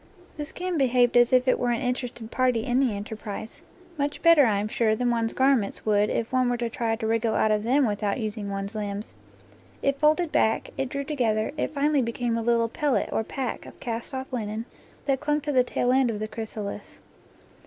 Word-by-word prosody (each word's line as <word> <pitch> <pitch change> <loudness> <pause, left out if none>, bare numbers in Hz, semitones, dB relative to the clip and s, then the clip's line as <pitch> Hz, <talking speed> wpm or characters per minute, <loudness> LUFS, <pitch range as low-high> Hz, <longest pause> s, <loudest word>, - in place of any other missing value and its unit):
The 295 - -4
skin 360 0 -3
behaved 245 -2 +3
as 240 0 +5
if 255 0 +4
it 255 - +3
were 245 - 0
an 235 - +1
in 250 -1 +1
terested 240 -3 -7
party 250 -3 +2
in 245 +1 +1
the 255 -6 +2
enterprise; 210 +1 -7 0.4
much 285 +1 -2
better, 335 -6 +7
I 210 -2 +2
am 205 +1 -1
sure, 220 0 +1
than 245 +2 0
one's 230 -1 0
garments 260 -6 +1
would 210 -1 +3
if 230 +2 -2
one 255 -1 +3
were 245 - 0
to 235 -1 -3
try 225 -1 -1
to 225 0 -5
wriggle 225 0 +1
out 215 - +3
of 210 -1 +2
them 260 +5 +3
without 205 0 -1
using 215 -2 -4
one's 195 +1 -4
limbs. 205 -1 -4 0.7
It 275 0 +1
folded 310 +2 +3
back, 220 - +1
it 270 -1 -2
drew 280 +1 -3
together, 235 -7 0
it - - -1
finally 290 -1 +1
became 235 0 -1
a 230 - -1
little 230 0 +2
pellet 285 +4 0
or 220 - 0
pack 255 +2 -4
of - - -13
cast 235 +2 -4
off 265 0 -6
linen 220 -1 -3 0.4
that 275 -2 +1
clung 295 +1 0
to 295 - -2
the 255 -3 +4
tail 245 0 0
end 260 -1 +3
of 220 - -2
the 215 - -3
chrysalis. 215 -2 -7
240 Hz, 215 wpm, -26 LUFS, 220-265 Hz, 0.7 s, better